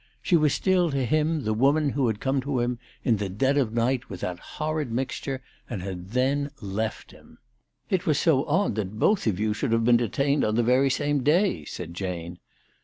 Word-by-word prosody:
She 180 - +3
was 150 -3 +4
still 185 -3 +2
to 135 -3 0
him 155 +3 +1
the 110 - 0
woman 140 +5 +3
who 135 -2 +1
had 110 -2 -1
come 135 0 0
to 135 -1 -1
him 120 0 -1 0.2
in 115 -3 +2
the 100 -1 -3
dead 130 +9 +1
of 130 -6 +1
night 120 +3 0
with 90 - -7
that 90 -1 -3 0.2
horrid 155 -4 -2
mixture, 130 +2 -3 0.3
and 105 -8 -4
had 95 -1 -6
then 135 +4 +1
left 105 0 -4
him. - - -18 0.3
" - - -47
It 190 0 0
was 155 - +3
so 145 -5 +3
odd 175 - +1
that 105 0 -4
both 200 - +2
of 100 -3 0
you 105 0 +1
should 115 +3 -2
have 115 0 +2
been 120 0 +6
detained 140 +5 +1
on 110 0 +1
the 120 - +3
very 130 +3 +3
same 145 +1 0
day," 150 - +2
said 85 +1 -7
Jane. 90 -2 -5
125 Hz, 215 wpm, -26 LUFS, 110-145 Hz, 0.3 s, been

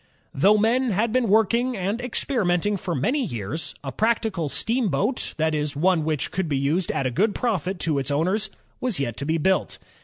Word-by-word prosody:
Though 200 +10 +4
men 240 +4 +2
had 215 +4 0
been 255 -2 +2
working 230 +4 +2
and 200 +5 -2
experimenting 210 -6 0
for 180 -3 -3
many 255 - 0
years, 140 - -4
a 135 - -4
practical 215 - 0
steamboat, 220 - -1
that 160 0 +1
is, 150 -1 -1
one 170 +2 +2
which 155 -2 -1
could 185 -3 -2
be 140 - +1
used 155 +7 0
at 135 - -2
a 130 - 0
good 205 - +1
profit 195 -6 -1
to 155 -4 +1
its 135 0 -1
owners, 185 +9 +1 0.3
was 245 - 0
yet 120 -5 -2
to 140 - -2
I - - -6
be 160 +1 +1
built. 190 +4 +1
185 Hz, 195 wpm, -24 LUFS, 150-225 Hz, 0.3 s, Though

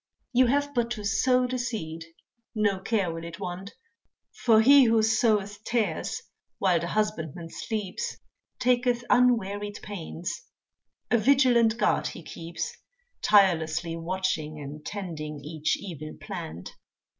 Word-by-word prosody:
You 250 +1 +5
have 285 +3 +1
but 240 -2 +1
to 210 - -6
sow 250 +5 +3
the 255 0 -2
seed, 165 -9 -4 0.5
no 205 -3 +1
care 190 -4 0
will 165 0 -6
it 170 0 -8
want, 185 +1 -6 0.6
For 225 -3 +4
he 275 +4 +8
who 225 -1 +4
soweth 215 -2 +1
tares 235 -2 -1 0.3
while 180 -3 +3
the 170 - -3
husbandman 170 -6 -2
sleeps 210 -5 -4 0.4
Taketh 245 -1 +2
unwearied 205 -4 +2
pains, 175 -4 -5 0.7
a 235 - +5
vigilant 240 -3 +4
guard - - +2
he 170 - -8
keeps 170 - -6 0.5
Tirelessly 170 -4 +3
watching, 165 -3 -2
and 145 +1 -8
tending 155 -7 -5
each 155 0 -1
evil 155 -6 -8
plant. 170 - -7
205 Hz, 125 wpm, -27 LUFS, 165-235 Hz, 0.7 s, he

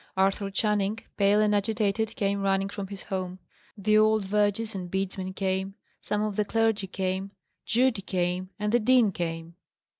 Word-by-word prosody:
Arthur 195 +1 +2
Channing, 210 +1 0 0.2
pale 200 +1 +4
and 210 -1 +3
agitated, 215 +1 0
came 200 -4 0
running 195 0 +1
from 200 -1 -5
his 200 0 -8
home. 185 -2 -4 0.4
The 215 +2 +3
old 215 -1 +3
vergers 210 +2 +1
and 185 -2 -5
bedesmen 190 0 -3
came; 190 0 -1 0.3
some 210 0 -1
of 210 -2 -2
the 210 - +3
clergy 220 -1 +1
came; 190 +1 -2 0.4
Judy 240 -2 +2
came; 180 -1 -1
and 210 0 -1
the 240 - +4
dean 240 -2 +4
came. 165 -1 -4
200 Hz, 160 wpm, -27 LUFS, 190-215 Hz, 0.4 s, pale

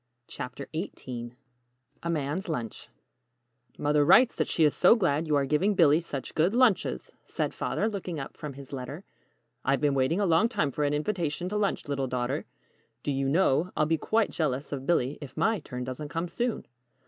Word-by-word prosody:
] 120 - -52
CHAPTER 130 0 -6
XVIII 125 -8 -5 0.7
A 170 - -3
MAN'S 160 +3 -2
LUNCH 120 -8 -4 0.9
"MOTHER 150 0 +2
writes 195 - +6
that - - 0
she 165 - +2
is 150 - +4
so - - +6
glad 165 -7 +1
you 150 - +2
are 140 -1 +2
giving 180 +9 +2
Billy 160 -3 +5
such 140 -6 -6
good 175 +8 +2
lunches," 245 -6 +2
said - - -2
Father, - - -1
looking 185 -6 -4
up 135 - -7
from 150 -2 -7
his 140 0 -11
letter. 135 +7 -6 0.6
"I've 135 +1 +2
been 145 -1 +2
waiting 135 +7 +1
a 205 - +2
long 185 +6 +4
time 175 - 0
for 150 +2 -1
an 145 +1 +1
invitation 175 0 -2
to 210 - -4
lunch, 205 -6 0
little 140 -2 -1
daughter. 125 +3 -2 0.6
Do 145 - -1
you 135 0 0
know, 165 +1 +2
I'll 155 - +3
be 160 +1 +1
quite 225 0 +1
jealous 145 -3 -2
of 135 -2 -5
Billy 145 -5 +1
if 145 - -10
my 220 -2 +2
turn 125 -4 -6
doesn't 130 +4 -5
come 165 +3 -2
soon!" 235 +7 -2
150 Hz, 195 wpm, -28 LUFS, 135-180 Hz, 0.9 s, writes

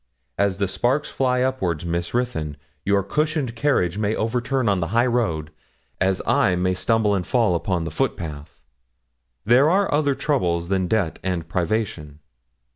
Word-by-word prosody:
As 100 -2 +1
the 100 -1 0
sparks 125 +9 0
fly 125 -1 +1
upwards, 90 - -1
Miss 85 0 -2
Ruthyn! 120 - -2 0.3
Your 100 0 +2
cushioned 150 - -1
carriage 110 -9 +1
may 105 +1 0
overturn 125 +2 -1
on 100 -2 +2
the 85 - -1
highroad, 115 -11 +1 0.5
as 95 0 +1
I 90 - +3
may 90 +1 +1
stumble 110 +2 +2
and 95 - +1
fall 115 -3 +2
upon 85 0 -1
the 85 - -4
footpath. 80 - -4 0.8
There 125 +7 +5
are 195 0 +2
other 145 -2 +2
troubles 90 - 0
than 95 -2 +1
debt 100 -5 0
and 90 -3 -2
privation. 85 -5 -2
100 Hz, 150 wpm, -23 LUFS, 85-125 Hz, 0.8 s, There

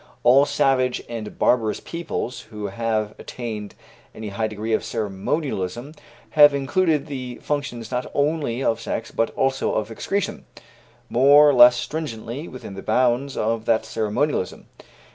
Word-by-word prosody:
All 135 +4 +6
savage 130 -2 +1
and 115 -3 -7
barbarous 115 -3 +2
peoples 170 -7 -5
who 105 -2 -6
have 110 0 -1
attained 110 -4 -6 0.4
any 110 -1 -6
high 110 +3 -1
degree 110 +1 -4
of - - +1
ceremonialism 115 - -3 0.4
have 145 -2 +7
included 150 +1 +1
the 130 -5 -6
functions 125 -6 -3
not 125 0 -2
only 145 -4 0
of 115 -2 0
sex, 115 - -4
but 115 - 0
also 135 0 0
of 110 +1 -2
excretion, 200 - -3 0.6
more 140 +4 +6
or 145 - +5
less 120 -1 +8
stringently 135 0 -5
within 125 -6 -9
the 95 - -7
bounds 125 +5 +1
of 115 +1 -1
that 110 -1 +2
ceremonialism. 110 0 -1
120 Hz, 140 wpm, -23 LUFS, 110-140 Hz, 0.6 s, less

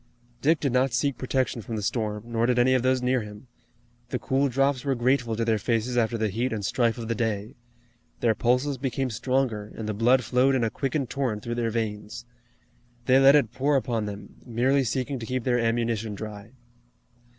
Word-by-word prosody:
Dick 160 +3 +3
did 140 -4 -1
not 130 0 +2
seek 135 +2 +1
protection 130 -2 -1
from 115 +2 -6
the 105 - -3
storm, 105 -1 -2
nor 115 0 0
did 125 -1 +2
any 125 +2 +4
of 130 - +3
those 130 0 +1
near 125 0 +2
him. 105 +2 -10 0.6
The 125 - -1
cool 135 +4 0
drops 135 0 +1
were 140 -2 0
grateful 120 -1 +1
to 115 +1 -1
their 110 -2 +1
faces 115 +2 -1
after 115 -1 +1
the 110 -1 0
heat 120 +6 -1
and 105 -3 -3
strife 115 +3 +1
of 115 -2 -5
the 115 - 0
day. 110 -2 -2 0.7
Their 115 -2 +3
pulses 125 +4 +1
became 135 -1 -2
stronger, 115 -3 -1
and 110 - -5
the 110 - -1
blood 125 +5 +3
flowed 130 +3 +2
in 125 - +1
a 110 - 0
quickened 135 -1 -2
torrent 125 -7 -2
through 120 - -3
their 120 -1 -1
veins. 110 0 -4 0.8
They 130 +1 +5
let 135 +1 +7
it 125 -6 +2
pour 140 +3 +1
upon 115 -5 0
them, 100 -1 -9
merely 130 +4 +1
seeking 130 +2 -2
to 115 - -6
keep 130 -1 -2
their 120 -1 +1
ammunition 115 -2 -1
dry. 105 +2 -8
120 Hz, 205 wpm, -26 LUFS, 110-130 Hz, 0.8 s, let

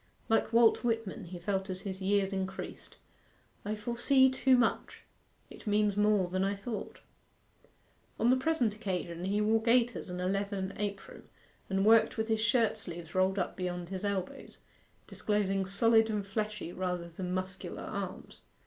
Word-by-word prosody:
Like 225 0 +2
Walt 230 0 +5
Whitman 225 -3 -2
he 175 +1 -8
felt 190 +2 -2
as 185 0 -3
his 195 -1 -6
years 195 0 +1
increased 190 0 -5 0.7
'I 210 +1 -2
foresee 240 +5 +3
too 260 0 +4
much; 235 -2 0 0.5
it - - -12
means 210 -1 +2
more 210 -2 +3
than 185 +1 -1
I 200 +1 0
thought.' 200 +1 -6 1.2
On 235 +3 +4
the - - +5
present 260 -5 +1
occasion 180 -5 -4
he 205 +2 +1
wore 220 +1 +3
gaiters 235 -2 +2
and 180 0 -5
a 180 - -2
leathern 195 0 -2
apron, 200 -1 -6 0.4
and 195 +1 +1
worked 225 +1 +5
with 220 +1 -1
his 220 -1 +1
shirt 225 -1 +2
sleeves 175 -4 -8
rolled 190 +1 +2
up 185 - -1
beyond 180 -1 -4
his 190 0 -5
elbows, 195 -3 -4 0.5
disclosing 195 -2 -1
solid 225 +3 +4
and 210 -2 -2
fleshy 210 -3 -3
rather 180 -2 -3
than 180 +2 -5
muscular 185 +1 -4
arms. - - -6
200 Hz, 160 wpm, -31 LUFS, 190-225 Hz, 1.2 s, Walt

